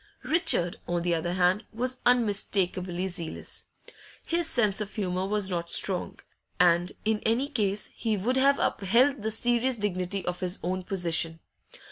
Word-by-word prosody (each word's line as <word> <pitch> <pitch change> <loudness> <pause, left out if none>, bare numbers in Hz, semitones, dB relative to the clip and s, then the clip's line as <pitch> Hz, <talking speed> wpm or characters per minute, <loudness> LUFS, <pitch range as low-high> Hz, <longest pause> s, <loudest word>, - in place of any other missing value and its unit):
Richard, 300 - 0
on 175 -1 -1
the 175 0 +1
other 170 +1 -1
hand, 185 +4 +2
was 250 +3 -2
unmistakably 195 -6 +1
zealous. 175 -3 -5 0.6
His 340 0 0
sense 215 -8 +2
of 210 0 -5
humour 185 -2 -2
was 205 -2 -1
not 170 -1 -3
strong, 185 -3 0 0.4
and 175 0 +3
in 220 0 +1
any 235 +6 +1
case 210 -7 -1
he 220 -3 -1
would 235 +7 0
have 275 +1 +4
upheld 235 +7 +2
the 220 - -1
serious 240 +3 +2
dignity 195 -2 -2
of 180 0 -3
his 180 0 -1
own 185 +1 -2
position. 165 -3 +1
195 Hz, 150 wpm, -27 LUFS, 180-230 Hz, 0.6 s, have